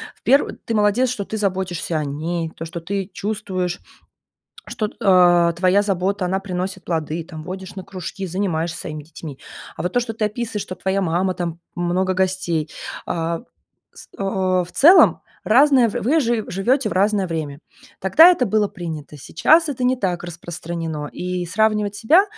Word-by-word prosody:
В - - -32
пер 275 +2 +3
ты 230 - -2
молодец, 215 +4 +3
что 225 -4 -3
ты 220 - -4
заботишься 185 -4 -1
о 155 - -1
ней, 160 +4 -3
то, - - -7
что 165 +1 -6
ты 195 +3 -4
чувствуешь, 190 -4 -3 0.9
что, 215 -2 -2
а, 175 -4 +5
твоя 185 +3 +3
забота, 195 -1 -1
она 190 +2 0
приносит 190 0 -4
плоды, 165 -1 -2
там, 160 -1 -9
водишь 185 +2 -7
на 190 - -6
кружки, 190 +1 -6
занимаешься 170 -3 -2
своими 155 -3 -6
детьми. 150 -2 -10 0.4
А - - -5
вот 180 - -2
то, 245 - +2
что 235 -2 -4
ты 220 - -3
описываешь, 220 0 -3
что 185 - -6
твоя 190 +1 -1
мама, 185 +1 0
там, 170 -2 -4 0.2
много 180 +2 0
гостей, 185 -4 -1 0.4
а, 165 0 -2 0.5
с - - -13
а, 190 -2 0
в 180 - -15
целом 320 - +6 0.2
разное, 260 +1 +5
в - - -8
вы 295 +9 +3
жи 230 -4 0
живете 220 +7 +1
в - - -4
разное 200 0 +2
время. 155 -4 -4 0.4
Тогда 250 - +7
это 270 -8 +1
было 210 0 +2
принято. 160 -5 -7
Сейчас 310 - +3
это 260 -3 -3
не 250 +1 +3
так 180 -6 -2
распространено. 165 -2 -5
И 180 0 -3
сравнивать 210 +2 +1
себя, 310 - +5
185 Hz, 170 wpm, -21 LUFS, 170-210 Hz, 0.9 s, Тогда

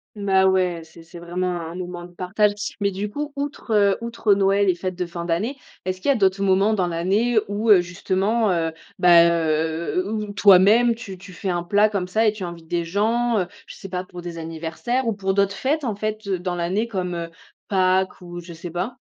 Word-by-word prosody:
Bah 195 -2 +2
ouais, 180 -3 +1
c'est 160 +1 -15
c'est 170 +1 -12
vraiment 175 +2 -3
un 165 +1 -7
moment 175 -1 -6
de 175 - -13
partage. 200 +4 +1 0.3
Mais 200 - +2
du 195 +2 -4
coup, 290 +7 -5
outre, 285 -4 -5
heu, 200 -2 +4
outre 230 -3 +1
Noël 195 0 +2
et 185 - +4
fêtes 185 +1 -4
de 180 0 -3
fin 170 0 -6
d'année, 195 +11 -1 0.3
est-ce 185 0 -3
qu'il - - +2
y - - +7
a - - 0
d'autres 195 -2 +2
moments 195 +3 +3
dans 185 -4 +1
l'année, 195 +8 +1
où, 210 +2 0
heu, 195 - +8
justement, 195 +5 0
heu, 165 -2 0 0.3
bah, 170 -1 +7
heu, 160 +1 0
où 215 0 -2
où 205 - -7
toi-même 205 +5 +6
tu 205 -5 -9
tu 185 +1 -13
fais 190 +3 -5
un 175 -1 0
plat 205 +4 +3
comme 195 -4 -3
ça 220 +4 +2
et 210 - +4
tu 210 -3 -6
invites 170 -2 -8
des 170 0 -1
gens, 225 +6 +1
heu, 185 - 0 0.2
je - - -10
sais 195 - -10
pas 180 0 -3
pour 180 -1 -10
des 175 -1 -7
anniversaires 165 +10 -3
ou 225 - 0
pour 195 -1 -1
d'autres 200 0 +1
fêtes, 295 +8 0
en 225 - -1
fait, 215 +1 -3
heu, 190 -2 -1
dans 180 0 -3
l'année 190 +7 -1
comme, 185 -5 -3
heu, 170 -1 -5 0.4
Pâques 185 -1 +1
ou, 175 -1 -9
je 170 0 -11
sais 170 +1 -8
pas? 195 +9 -4
190 Hz, 230 wpm, -22 LUFS, 175-210 Hz, 0.4 s, heu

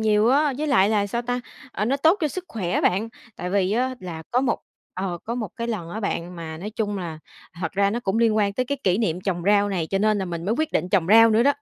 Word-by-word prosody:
nhiều 215 +1 +3
á, 290 +2 +3
với 305 - -1
lại 205 -9 +4
là 210 -2 +2
sao 235 +4 -2
ta, 245 +1 -2 0.3
ờ, 210 - -1
nó 265 +5 +1
tốt 320 +6 +4
cho 305 - +1
sức 370 +5 -6
khỏe 185 -6 -1
bạn. 200 +5 +1 0.3
Tại 180 - -4
vì 195 0 +1
á 255 +3 0
là 170 -3 -7
có 250 - +2
một 265 - 0 0.4
ờ, 185 -2 -3
có 235 - -3
một 220 -6 -3
cái 235 0 -3
lần 195 -8 -3
á 215 +5 -5
bạn, 180 -3 -3
mà 160 -1 -6
nói 205 +5 -5
chung 205 -2 -2
là 165 -3 -5 0.4
thật 165 - -2
ra 200 0 +2
nó 235 +3 -2
cũng 195 0 -1
liên 225 -2 +3
quan 205 -2 +2
tới 255 +4 -1
cái 280 +1 -2
kỷ 185 +2 +2
niệm 180 -6 0
trồng 180 -3 -2
rau 205 0 +4
này, 180 -5 -1
cho 195 - +1
nên 215 0 +2
là 190 - -1
mình 170 -2 -5
mới 215 +4 +1
quyết 315 0 0
định 180 - 0
trồng 185 -4 +2
rau 225 +3 +7
nữa 220 +2 +4
đó. 285 - +4
210 Hz, 285 wpm, -24 LUFS, 185-235 Hz, 0.4 s, rau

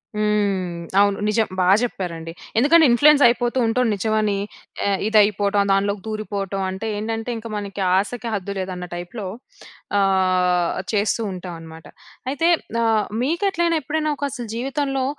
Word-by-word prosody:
హ్మ్. 205 -4 0 0.2
అవును. 200 0 +3
నిజం 220 +1 +1
బా 180 - +2
చెప్పారండి. 170 -8 -4 0.3
ఎందుకంటే, 310 +7 +6
ఇన్‌ఫ్లూయెన్స్ 290 +4 +6
అయిపోతూ 240 +1 0
ఉంటాం 250 +2 +1
నిజమని 215 0 0 0.5
ఆహ్, 195 -1 +1
ఇది 220 0 +3
అయిపోవటం 205 0 +2
దాంట్లోకి 200 +1 +1
దూరిపోవటం. 200 -3 -3
అంటే 190 +3 -5
ఏంటంటే, 225 +2 -3
ఇంక 225 +1 -8
మనకి 200 -1 -5
ఆశకు 230 +5 -1
హద్దు 200 -1 -3
లేదన్న 185 -1 -4
టైపులో 180 +4 -6 0.7
ఆహ్, 185 -3 +2
చేస్తూ 215 +1 +1
ఉంటామన్నమాట. 165 -3 -9 0.4
అయితే 285 +5 0 0.4
ఆహ్, 220 -2 +2 0.2
మీకెట్లైనా 340 +3 +1
ఎప్పుడైనా 305 +2 -1
ఒక - - -7
అసలు 240 -1 -6
జీవితంలో 270 +1 -1
210 Hz, 130 wpm, -21 LUFS, 190-240 Hz, 0.7 s, ఎందుకంటే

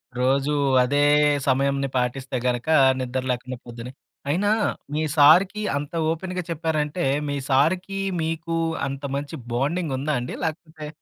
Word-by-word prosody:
రోజు 135 +3 +1 0.3
అదే 145 +3 +1 0.5
సమయంని 140 +1 +1
పాటిస్తే 130 +1 -2
గనుక 125 +3 -1 0.3
నిద్ర 130 0 -2
లేకుండా, 125 +1 -4
పొద్దున్న 120 0 -8 0.4
అయినా 195 +8 +1 0.4
మీ 155 - 0
సారుకి 180 +8 +5 0.2
అంత 145 0 -5 0.2
ఓపెన్‌గా 180 +2 -4
చెప్పారంటే, 160 0 -1 0.3
మీ 145 - -1
సారుకి 180 +8 +1 0.2
మీకు 165 +1 -2 0.3
అంత 135 0 -6
మంచి 140 0 -4 0.2
బాండింగుందా 145 +1 -1
అండి? 125 - -5
లేకపోతే 160 -1 -5
145 Hz, 120 wpm, -23 LUFS, 130-165 Hz, 0.5 s, సారుకి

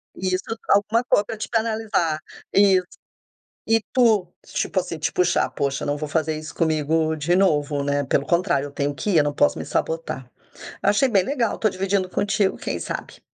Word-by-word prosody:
Isso, 185 0 -1 0.3
alguma 210 +4 +3
co 205 -4 +3
pra 220 - -6
te 215 - -5
penalizar, 220 -8 0 0.3
isso. 190 -2 +5 0.8
E 225 -1 +4
tu, 215 -8 +3
tipo 190 - -1
assim, 175 -2 -4
te 155 - -1
puxar: 180 -1 +2
"Poxa, 140 -1 -2
não 145 0 -1
vou 150 0 -4
fazer 155 -1 0
isso 155 -1 -9
comigo 160 0 +1
de 165 +4 +1
novo, 150 -6 +2
né, 145 0 0
pelo 140 +1 +1
contrário, 170 -5 +1
eu - - -12
tenho 145 0 -1
que 205 +10 -2
ir, 170 - +4
eu 150 - +5
não 145 - -1
posso 290 - +2
me - - -5
sabotar". - - -3 0.5
Eu - - +3
achei 210 +6 +3
bem 195 -5 +3
legal, 245 -2 -1
estou 215 - +1
dividindo 190 0 -1
contigo, 200 0 0
quem - - -4
sabe? - - -6
185 Hz, 190 wpm, -23 LUFS, 155-210 Hz, 0.8 s, isso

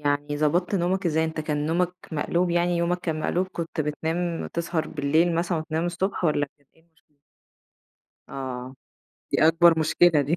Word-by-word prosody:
يعني 145 0 -1
ضبطت 170 +6 +1
نومك 185 +1 0
إزاي؟ 160 0 +2
أنت 160 0 -3
كان 150 -1 -2
نومك 175 +2 +1 0.2
مقلوب 170 +4 0
يعني 175 0 +1
يومك 170 +1 0
كان 160 -3 -3
مقلوب، 180 +4 0
كنت 165 -1 -4
بتنام 165 +3 -2
تسهر 170 -1 -2
بالليل 160 +3 +2
مثلًا 170 0 0
وتنام 160 +2 -2
الصبح 180 +2 -2
والَّا 145 -2 +2
كانت 140 -2 -34
إيه - - -26
المشكلة؟ 160 -3 -36 1.1
آه، 130 -1 -6 0.6
دي - - +4
أكبر 165 0 +5
مشكلة 160 0 +4
دي. 145 +5 0
165 Hz, 160 wpm, -25 LUFS, 150-175 Hz, 1.1 s, أكبر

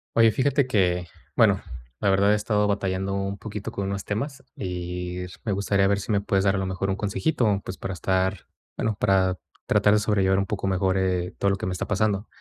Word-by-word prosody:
Oye, 115 -1 +6
fíjate 140 +3 +2
que, 90 -6 +1 0.3
bueno, - - +5 0.4
la 100 - +3
verdad 100 +2 +4
he - - +4
estado 105 -1 +1
batallando 95 -1 -1
un 100 0 -2
poquito 105 0 -6
con 100 - -3
unos 100 0 -3
temas, 135 +7 -4
y 90 -1 -4 0.3
me 105 - 0
gustaría 100 0 +2
ver 100 0 +1
si 105 - -4
me 100 - +3
puedes 100 -1 +1
dar 95 - +3
a - - 0
lo 95 - -1
mejor 95 +1 -2
un 95 - 0
consejito, 105 -1 0
pues, 95 - -6
para 95 - -4
estar, 95 +1 0 0.3
bueno, 110 -3 -1
para 95 -2 +2 0.3
tratar 105 - +4
de 105 - +4
sobrellevar 95 -3 +2
un 100 - +1
poco 100 -1 -2
mejor, 95 0 +1
eh, 90 -2 0
todo 100 - +2
lo - - +1
que 95 - -5
me 90 - -1
está 90 - -3
pasando. 105 0 0
100 Hz, 220 wpm, -25 LUFS, 95-105 Hz, 0.4 s, Oye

